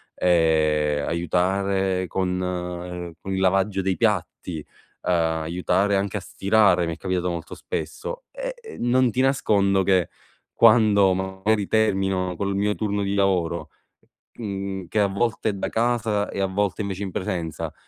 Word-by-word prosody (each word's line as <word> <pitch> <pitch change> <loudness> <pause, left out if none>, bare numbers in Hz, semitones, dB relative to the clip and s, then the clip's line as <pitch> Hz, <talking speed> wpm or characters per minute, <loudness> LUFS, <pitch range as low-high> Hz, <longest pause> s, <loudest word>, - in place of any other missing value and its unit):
ehm, 75 -4 +2
aiutare 95 +2 0
con, 90 +1 -1
uhm 90 -1 -4
con 95 - -4
il 95 - -1
lavaggio 95 +1 +2
dei 95 -1 -1
piatti, 90 -6 -1
ehm, - - -11 0.8
aiutare 90 +5 +1
anche 100 +1 -1
a - - -2
stirare, 95 -2 +3
mi 85 - -2
è - - -18
capitato 90 -1 -1
molto 85 -1 -5
spesso - - -5
e, - - -5 0.3
mhmm, 120 - 0
non 130 0 +4
ti 125 - 0
nascondo 100 -7 +2
che 95 -3 +2 0.4
quando 105 -4 +5
magari 95 +2 -1
termino 95 -4 +1
col 100 -1 -1
mio 105 +1 +1
turno 105 -2 -1
di 100 0 -1
lavoro, 85 -5 0 0.7
mhmm, 95 -4 -4
che 110 - -1
a 100 - +4
volte 110 +3 -1
è - - -1
da 95 - -3
casa 115 -3 0
e - - -5
a 95 - +2
volte 100 +2 -1
invece 100 0 -4
in 95 - -4
presenza, 90 -5 -3
95 Hz, 155 wpm, -24 LUFS, 90-105 Hz, 0.8 s, quando